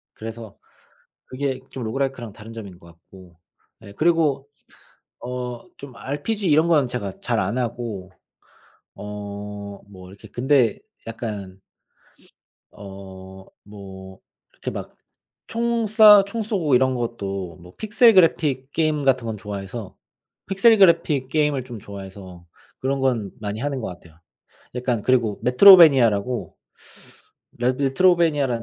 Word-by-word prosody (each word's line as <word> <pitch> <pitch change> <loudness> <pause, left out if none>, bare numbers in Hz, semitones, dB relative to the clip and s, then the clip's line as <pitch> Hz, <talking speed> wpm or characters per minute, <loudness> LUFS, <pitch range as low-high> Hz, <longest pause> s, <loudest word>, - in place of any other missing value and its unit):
그래서 110 -2 -9 0.7
그게 130 0 -3
좀 130 - -6
로그라이크랑 125 -1 -3
다른 110 +2 -12
점인 100 -6 -10
것 - - -17
같고. 85 +1 -18 0.4
예. 100 -2 -12
그리고 155 0 +1 0.7
어 125 -1 -6
좀 135 -3 -11
RPG 145 - -3
이런 155 +2 +4
거는 150 -6 +3
제가 100 -6 -5
잘 120 -3 -1
안 100 +6 -1
하고 115 -6 -4 0.8
어 105 0 -7 0.2
뭐 90 -2 -13
이렇게 100 +3 -14
근데 125 -1 +1 0.3
약간 105 -5 -7 1.1
어 95 -1 -11 0.2
뭐 95 -2 -12 0.3
이렇게 - - -6
막 - - -8 0.5
총 235 0 -1
쏴 210 -1 +7
총 200 +4 -5
쏘고 185 - 0
이런 130 +1 +3
것도 100 -7 -4
뭐 90 +1 -15
픽셀 225 +2 +4
그래픽 150 -7 +2
게임 155 -3 0
같은 130 -3 +2
건 110 -1 -4
좋아해서 100 +1 -7 0.5
픽셀 215 +4 +4
그래픽 165 -8 +3
게임을 150 -2 0
좀 120 -3 -9
좋아해서 95 -3 -11 0.3
그런 135 +1 -1
건 120 -7 0
많이 105 0 -5
하는 140 0 -3
것 - - -4
같아요. 85 -3 -13 0.6
약간 125 -3 -1
그리고 115 -4 +1
metroidvania라고 125 - +6 1.0
레 125 +1 +1
메트로베니아라는 140 -2 +2
120 Hz, 270 characters per minute, -22 LUFS, 100-145 Hz, 1.1 s, 쏴